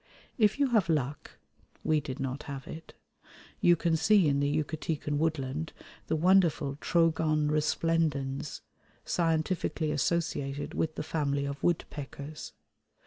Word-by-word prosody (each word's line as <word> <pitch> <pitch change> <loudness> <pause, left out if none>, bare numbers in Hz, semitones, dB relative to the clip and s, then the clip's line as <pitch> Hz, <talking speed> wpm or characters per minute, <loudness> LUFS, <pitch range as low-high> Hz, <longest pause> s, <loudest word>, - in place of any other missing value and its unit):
If 215 +1 +4
you 280 -2 +3
have 215 -8 +2
luck 145 -2 -2 0.5
(we 155 -1 +3
did 135 -1 -6
not 135 +1 -3
have 135 -1 -6
it), 160 +1 -9 0.6
you 175 - +5
can 165 0 +1
see 185 +2 +4
in 140 -1 +2
the 140 0 +1
Yucatecan 155 0 -2
woodland 155 -1 -1 0.3
the 160 - +1
wonderful 165 -5 +3
Trogon 155 -2 +2
resplendens, 150 -2 0 0.4
scientifically 165 -1 0
associated 145 -2 -1
with 160 -1 -1
the - - -3
family 140 -3 -1
of 140 0 -5
woodpeckers. 150 -3 -3
155 Hz, 125 wpm, -30 LUFS, 140-165 Hz, 0.6 s, you